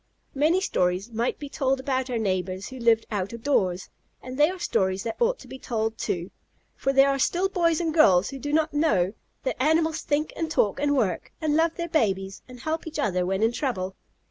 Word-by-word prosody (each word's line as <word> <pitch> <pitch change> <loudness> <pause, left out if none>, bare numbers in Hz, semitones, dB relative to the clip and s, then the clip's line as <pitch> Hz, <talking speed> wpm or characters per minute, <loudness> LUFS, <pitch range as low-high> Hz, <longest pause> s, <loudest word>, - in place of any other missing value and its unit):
Many 315 +7 +2
stories 185 - 0
might 230 +2 -1
be 290 - -7
told 270 -1 0
about 260 -1 -1
our 245 - -1
neighbors 185 -2 -2
who 260 -1 -9
live 230 -1 +4
out 200 0 -2
of 230 -1 -8
doors, 190 -10 0 0.3
and 255 0 -8
they 295 +3 +4
are 375 - -5
stories 190 - 0
that 225 - -4
ought - - +3
to - - -14
be 265 - -9
told, 225 -2 -2
too, 175 +1 -3 0.4
for 270 - 0
there 275 +1 +5
are 275 - -1
still 355 +7 +2
boys 335 -4 +1
and 330 -2 -1
girls 200 - +5
who 270 - -7
do 290 +2 -4
not 315 0 +1
know 250 - +2 0.3
that 260 - -2
animals 320 +2 +2
think 300 +1 -1
and 325 -1 -2
talk 215 -6 +1
and 285 0 +1
work, 220 -7 -1
and 310 -2 0
love 330 +1 +2
their 340 -1 -3
babies, 195 - 0
and 250 -1 -12
help 315 +3 -3
each 320 - -6
other 180 -3 0
when 195 +3 0
in 225 - +4
trouble. 190 -8 -3
260 Hz, 220 wpm, -26 LUFS, 200-310 Hz, 0.4 s, there